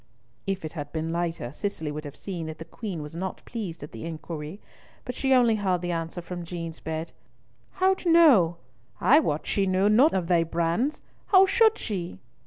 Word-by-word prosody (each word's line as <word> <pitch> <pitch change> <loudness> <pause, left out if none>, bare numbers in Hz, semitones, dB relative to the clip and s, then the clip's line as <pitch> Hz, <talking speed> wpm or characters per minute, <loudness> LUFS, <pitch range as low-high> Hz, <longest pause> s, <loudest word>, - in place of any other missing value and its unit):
If 190 -3 -2
it 155 - -5
had 145 -3 -6
been 160 0 -3
lighter, 170 -7 -2
Cicely 160 -2 -4
would 150 +1 -6
have 145 -1 -8
seen 170 -1 -5
that 160 0 -6
the 165 - -8
Queen 185 -8 -6
was 150 +2 -9
not 185 +2 -5
pleased 190 -10 -6
at 145 - -9
the - - -8
inquiry, 160 +1 -6 0.5
but 250 - -4
she 270 +2 -1
only 240 -4 +5
heard 185 -4 0
the 175 0 -2
answer 165 +1 -4
from 175 0 -6
Jean's 165 -1 -6
bed, 160 +1 -4 0.6
"Hout 375 -1 +1
no, 270 - +6 0.4
I 295 +5 +6
wad 150 - -1
she 195 -1 0
knew 190 +2 +3
nought 250 +7 +5
of 180 -3 0
thae 175 -2 +4
brands. 170 - -1 0.2
How 385 -1 +7
should 440 +3 +4
she?" 180 - -4
175 Hz, 195 wpm, -26 LUFS, 165-220 Hz, 0.6 s, How